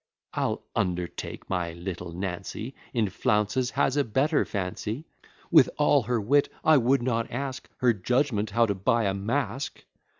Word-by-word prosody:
I'll - - -1
undertake, 90 -1 -3
my 90 -3 -2
little 85 0 -6
Nancy 95 +7 -5 0.2
In 115 -4 +1
flounces 105 +6 +1
has 135 -1 +3
a 145 - +3
better 140 +6 +2
fancy; 105 - -4 0.5
With - - +7
all 145 -1 +4
her 120 +1 0
wit, 140 +7 +3
I 155 -1 +6
would 130 0 +3
not 115 -2 0
ask 130 +1 -4
Her 125 -2 +4
judgment 110 +1 0
how 115 +3 +3
to 105 - 0
buy 105 +5 +1
a 100 -2 +1
mask. 115 +5 -2
115 Hz, 155 wpm, -27 LUFS, 95-130 Hz, 0.5 s, With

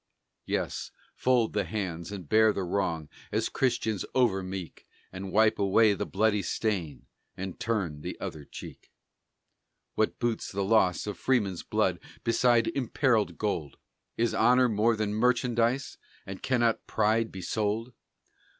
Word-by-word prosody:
Yes, - - -2 0.2
fold 125 -3 +2
the 105 - +1
hands, 90 -5 -4
and 95 -6 -7
bear 110 +4 +5
the 100 - -2
wrong 85 -4 -1 0.2
As - - 0
Christians 110 -5 0
over 115 -7 +3
meek, 95 -3 -7 0.2
And 95 0 -6
wipe 110 +2 +3
away 105 +2 +4
the - - -3
bloody 105 0 +2
stain, 90 - -2 0.3
And 95 -1 -6
turn 95 -10 -2
the - - -6
other 75 - -6
cheek. - - -11 1.0
What 110 - 0
boots 120 -2 -2
the 100 0 -1
loss 95 -3 +3
of 105 -4 -5
freemen's 105 -9 +1
blood - - 0 0.2
Beside 115 0 +3
imperilled 125 -4 +1
gold? 85 -9 -2 0.4
Is 115 0 +1
honor 125 +1 +4
more 110 +1 +2
than 105 -1 -1
merchandise? 120 +2 +1 0.3
And 95 0 -7
cannot 120 -3 +1
pride 110 +1 +1
be 95 -1 -7
sold? 110 +5 -1
110 Hz, 140 wpm, -28 LUFS, 95-115 Hz, 1.0 s, bear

